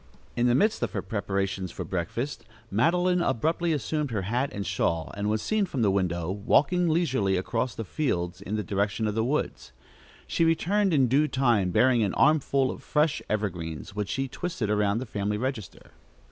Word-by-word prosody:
In 120 0 +2
the 120 - +4
midst 215 - +2
of - - -2
her - - -2
preparations 95 -3 -2
for - - -5
breakfast, 100 - -3 0.3
Madeline 175 - +2
abruptly 165 +5 0
assumed 150 +1 -1
her 105 -5 -2
hat 120 +8 -1
and 100 -1 -4
shawl, 80 -1 -1
and 105 +1 -1
was 110 0 0
seen 215 -2 +1
from 135 -9 -1
the 100 - +3
window, 90 -3 0
walking 155 - +2
leisurely 130 - +1
across 115 +6 -2
the 115 - -4
fields 90 - -2
in 105 - -4
the 105 - -1
direction 100 +1 -1
of 105 - 0
the 110 +1 0
woods. 140 +6 -2 0.5
She - - 0
returned 180 +5 +2
in 135 -5 +4
due 140 +5 +3
time, 120 -10 +2
bearing 125 +6 +4
an 100 -3 0
armful 140 -3 +3
of - - -9
fresh 150 +1 +1
evergreens, 90 -6 -3
which 105 -2 -2
she 135 0 -1
twisted 130 - -3
around 105 0 +2
the 125 - -3
family 105 -2 -2
register. 115 -4 -5
115 Hz, 185 wpm, -27 LUFS, 100-150 Hz, 0.5 s, the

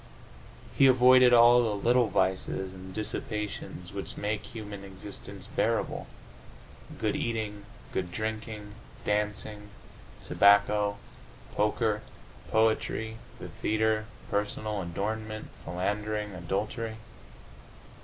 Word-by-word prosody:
He 135 - +7
avoided 130 0 +7
all 120 0 +8
the 110 -3 0
little 120 +3 +3
vices 95 -1 0
and 95 0 -9
dissipations 105 -3 -4
which 100 -1 -6
make 105 0 -1
human 105 -3 -8
existence 100 +1 -9
bearable: - - 0 0.9
good - - 0
eating, 105 -3 -2 0.3
good 90 -2 -2
drinking, 110 0 -4 0.3
dancing, 105 0 -1 0.5
tobacco, 100 0 +4 0.6
poker, 105 0 +1 0.5
poetry, 110 0 +1 0.2
the - - -8
theatre, 110 0 0 0.2
personal 105 0 -1
adornment, 110 +5 -4
philandering, 105 +3 -2
adultery. 105 +6 -3
105 Hz, 90 wpm, -29 LUFS, 100-110 Hz, 0.9 s, all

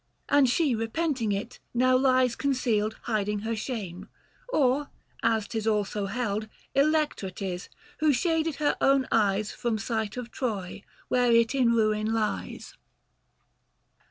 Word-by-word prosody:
And 285 -2 +5
she 285 +1 +2
repenting 230 +1 -1
it, 205 +5 -4 0.2
now 255 +1 +4
lies 255 -2 +3
concealed, 235 -6 0
Hiding 210 -2 -1
her 225 +1 -2
shame; 210 -5 -5 0.4
or 285 - +2 0.3
as 225 -2 +1
'tis 220 -1 -3
also 210 -1 0
held 215 -1 -2 0.2
Electra 295 -7 +1
'tis, 185 -1 -5 0.3
who 310 -1 +4
shaded 325 +2 +1
her 295 0 +1
own 270 -1 +3
eyes 210 -1 +2
From 235 -3 -2
sight 220 0 -3
of 240 -2 -6
Troy, 205 -7 -3 0.3
where 245 -1 +2
it 230 +1 +4
in 250 -4 +3
ruin 215 -1 +1
lies. 215 -2 -3
230 Hz, 130 wpm, -27 LUFS, 215-260 Hz, 0.4 s, And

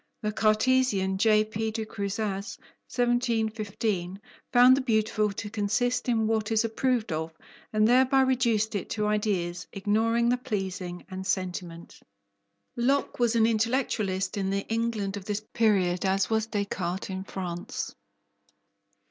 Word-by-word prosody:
The 210 - 0
Cartesian 215 -3 +2
J.P. 215 0 +2
de 220 0 -3
Crousaz 200 0 -3 0.3
(1715) 220 -6 -1 0.3
found 250 +1 +7
the 275 - 0
beautiful 215 -3 +1
to 205 - -5
consist 225 +5 0
in 225 -2 +2
what 220 0 0
is 225 +1 +2
approved 230 -1 0
of, 160 +1 -2 0.4
and 215 0 +3
thereby 260 +2 +5
reduced 235 -5 +2
it 200 - -3
to 210 -1 -1
ideas, 195 -5 -1
ignoring 225 +4 +1
the 250 - +2
pleasing 190 -6 -4
and 190 0 -5
sentiment. 180 -2 -4 0.8
Locke 270 +4 0
was 240 -1 +2
as 225 - +4
intellectualist 215 -4 0
in 190 -1 -1
the 200 0 -1
England 225 -4 -1
of 195 - -9
this 210 0 -2
period 190 -6 +2
as 195 +2 +1
was 220 0 +1
Descartes 195 -4 -3
in 190 0 -4
France. 180 -3 -5
215 Hz, 130 wpm, -27 LUFS, 195-230 Hz, 0.8 s, found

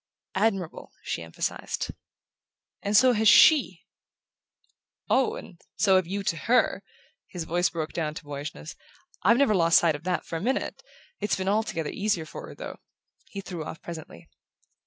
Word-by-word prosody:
"Admirable," 195 -4 -1
she - - -3
emphasized. 80 0 -3 0.9
"And 205 +1 +2
so 255 +3 +6
has 220 -1 +2
SHE." 260 - +6 1.3
"Oh, 260 -1 +3
and 175 - -11
so 195 -3 +4
have 185 -2 0
you 200 +2 -3
to 165 - -1
HER!" 245 +9 +2 0.5
His 175 -3 -5
voice 175 +2 +1
broke 160 -2 -4
down 155 -2 -2
to 180 - -8
boyishness. 145 - -7 0.5
"I've 230 +6 +5
never 275 -5 +4
lost 170 -3 +5
sight 165 -3 +3
of 145 - -9
that 180 -1 -1
for 165 - -4
a - - -6
minute. 255 +6 -2 0.4
It's 210 - 0
been 190 0 -3
altogether 200 -6 0
easier 200 -5 -1
for - - -9
her, - - -11
though," - - -8 0.5
he 200 - -6
threw 180 -4 -6
off 160 - -7
presently. 160 - -9
180 Hz, 160 wpm, -27 LUFS, 160-210 Hz, 1.3 s, so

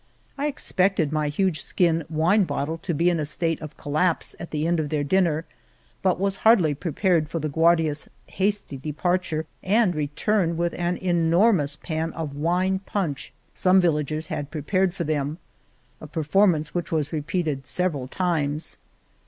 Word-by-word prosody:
I 285 +1 -1
expected 190 - +1
my 155 -1 0
huge 155 +1 0
skin 165 -2 +1
wine 170 +6 +3
bottle 160 0 -3
to 170 - -3
be 170 +3 +2
in 170 - 0
a - - 0
state 165 +2 -1
of 155 -2 -9
collapse 155 +4 0
at 170 - -7
the 150 0 -2
end 170 0 +1
of 150 -2 -2
their 150 -1 0
dinner, 165 0 +1 0.6
but 185 -2 +1
was 195 0 0
hardly 195 -10 +4
prepared 165 +1 0
for 165 - -3
the 155 -1 -2
Guardias's 160 -1 +2 0.2
hasty 200 -6 -2
de 150 +3 -5
parture 175 -1 -1 0.2
and 205 -1 +2
return 165 +4 0
with 170 0 0
an 175 0 -1
enormous 170 -2 +2
pan 160 -1 -3
of 155 -4 -5
wine 180 +5 +1
punch 190 -7 -3 0.2
some 185 +1 +4
villagers 155 -2 0
had 145 -1 -4
prepared 180 +4 0
for 170 - -2
them, 150 -1 -1 0.6
a 155 - -8
performance 155 0 +2
which 175 -3 -3
was 155 -1 -1
repeated 155 -3 -2
several 160 -8 0
times. 155 -2 -1
165 Hz, 160 wpm, -24 LUFS, 150-185 Hz, 0.6 s, hardly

